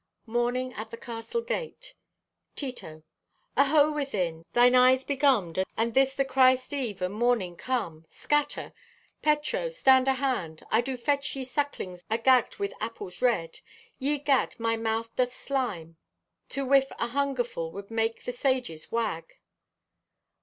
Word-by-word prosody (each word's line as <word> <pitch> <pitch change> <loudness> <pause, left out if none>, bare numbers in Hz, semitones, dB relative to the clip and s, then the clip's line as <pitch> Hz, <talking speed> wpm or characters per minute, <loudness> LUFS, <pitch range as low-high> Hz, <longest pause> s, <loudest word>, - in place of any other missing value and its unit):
(Morning 245 +2 -1
at 220 +1 -7
the 230 - -8
Castle 230 - -4
Gate.) - - -5 0.6
(Tito) 200 - -7 0.5
"Aho, 290 +2 +4
within! 185 - -2
Thine 245 +1 +5
eyes 255 +1 +5
begummed 255 - +2
and 230 +1 0
this 270 +1 +3
the 275 - +1
Christ 260 0 +3
eve 230 -10 -3
and 180 +2 -1
mornin' 220 -6 +1
come? 170 -10 -3
Scatter! 295 -1 -1 0.5
Petro, 300 +11 +1
stand 265 - +4
ahand! 255 - -1
I 220 - +4
do 260 +1 -4
fetch 280 +3 -1
ye 270 - -4
sucklings 250 -9 -3
agagged 235 +2 +3
with 400 0 -2
apples 215 -5 -6
red. 215 -10 +1 0.4
Ye 290 +2 +1
gad, 280 -4 +1
my 230 0 +1
mouth 225 0 -2
doth 250 -1 +1
slime! 190 -13 -3 0.5
To 275 0 -3
whiff 270 0 +4
a 235 - -2
hungerfull 245 -11 -1
would 200 +4 -9
make 225 0 -1
the - - -3
sages 245 - -2
wag." 220 -8 -2
250 Hz, 140 wpm, -28 LUFS, 220-275 Hz, 0.6 s, Thine